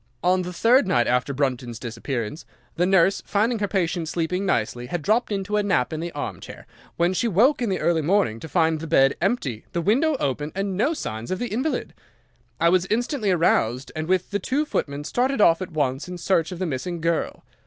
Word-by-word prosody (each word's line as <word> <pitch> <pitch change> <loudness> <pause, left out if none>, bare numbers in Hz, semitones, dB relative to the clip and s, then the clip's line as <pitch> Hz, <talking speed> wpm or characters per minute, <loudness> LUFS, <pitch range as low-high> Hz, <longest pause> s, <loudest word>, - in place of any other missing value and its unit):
On 185 +1 +3
the 180 0 -5
third 230 +6 +4
night 120 -10 +3
after 125 +3 +1
Brunton's 130 -4 -2
disappearance, 120 +3 -4 0.3
the 180 +1 +1
nurse, 190 0 +3
finding 220 +3 0
her 205 - 0
patient 175 -4 -1
sleeping 180 +4 -1
nicely, 120 - -1
had 165 +3 -4
dropped 220 +5 +1
into 200 +1 -1
a - - +3
nap 185 -10 0
in 155 - -3
the 170 +1 -4
armchair, 145 - -7 0.3
when 175 +2 +2
she 235 - 0
woke 235 - +3
in 235 - 0
the 190 - 0
early 170 -2 +2
morning 160 - +1
to 160 - -9
find 160 -2 +2
the 165 - -6
bed 135 -4 +4
empty, 160 - -1
the 175 - 0
window 275 - +2
open, 145 +2 -2
and 195 0 -2
no 280 - +1
signs 110 - -5
of 185 - -1
the 245 +3 -3
invalid. 260 +3 -2 0.7
I 170 - +4
was 185 +1 +2
instantly 240 +1 0
aroused, 135 -8 +1
and, 155 0 -3
with 185 +1 0
the 205 - 0
two 285 +7 -1
footmen, 145 - -3
started 255 - 0
off 165 -3 +5
at 185 - -4
once 140 -2 -1
in 180 0 -6
search 170 -1 +1
of 180 - -5
the 185 - -2
missing 165 +3 -3
girl. 165 0 -1
175 Hz, 210 wpm, -24 LUFS, 145-205 Hz, 0.7 s, off